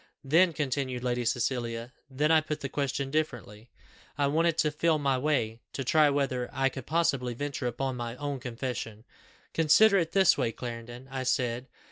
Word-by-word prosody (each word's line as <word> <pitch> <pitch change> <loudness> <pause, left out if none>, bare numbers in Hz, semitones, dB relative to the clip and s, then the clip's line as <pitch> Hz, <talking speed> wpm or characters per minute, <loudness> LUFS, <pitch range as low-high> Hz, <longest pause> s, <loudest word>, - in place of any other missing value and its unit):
"Then," 165 +6 +4
continued 135 -4 -2
Lady 125 -1 0
Cecilia, 120 0 -2 0.2
"then 150 +4 +1
I 160 -1 +6
put 155 -1 -4
the 140 - -3
question 140 -1 -2
differently. 120 -7 -3 0.5
I 145 - +2
wanted 165 +3 +2
to 155 -2 +2
feel 160 +1 +2
my 140 -2 +1
way, 125 -6 0
to 135 - -3
try 150 +3 +4
whether 135 -3 -1
I 135 0 +1
could 130 -1 -9
possibly 140 -7 +1
venture 140 -1 -3
upon 125 +2 -2
my 120 0 -4
own 145 0 -4
confession. 115 -3 -5 0.5
'Consider 195 +6 +5
it 165 -2 -2
this 190 -6 +5
way, 115 -4 0
Clarendon,' 120 +2 -7
I 135 -1 -3
said. 125 -1 -1
135 Hz, 170 wpm, -29 LUFS, 120-150 Hz, 0.5 s, I